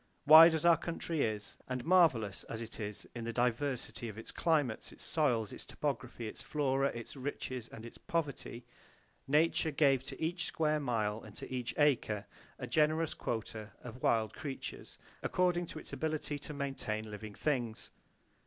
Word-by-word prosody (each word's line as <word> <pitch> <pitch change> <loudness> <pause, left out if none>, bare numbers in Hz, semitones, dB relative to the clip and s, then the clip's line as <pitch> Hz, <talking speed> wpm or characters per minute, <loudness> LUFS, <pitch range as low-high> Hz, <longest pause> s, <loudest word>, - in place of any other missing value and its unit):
Wide 160 +2 +10
as 160 - -1
our 170 -1 +7
country 165 -2 -2
is, 105 -3 -2
and 125 -1 -3
marvelous 145 - +4
as 115 - -5
it 115 0 -7
is 105 -1 -5
in 120 - -5
the 115 - -2
diversity 125 0 -1
of 105 - -9
its 110 - -7
climates, 150 -9 0
its - - -12
soils, 120 -9 +1
its - - -7
topography, 125 -5 -3
its - - -8
flora, 135 -2 +1
its 120 -1 -6
riches 130 -3 -4
and 115 - -10
its 115 - -11
poverty, 140 -6 -3 0.6
Nature 160 +3 +3
gave 135 -3 +3
to - - -8
each 165 +1 -1
square 155 -1 +1
mile 110 -5 -1
and 105 -2 -12
to - - -7
each 125 -2 -3
acre 120 -8 +2 0.3
a 130 - -5
generous 155 +5 +2
quota 110 -2 -4
of 125 +1 -9
wild 110 -3 +2
creatures, 140 -3 -6 0.2
according 175 -1 +1
to - - -8
its 155 - -10
ability 150 0 -2
to 150 - -7
maintain 135 -7 -3
living 105 0 -7
things. 120 -7 -1
130 Hz, 165 wpm, -34 LUFS, 115-155 Hz, 0.6 s, Wide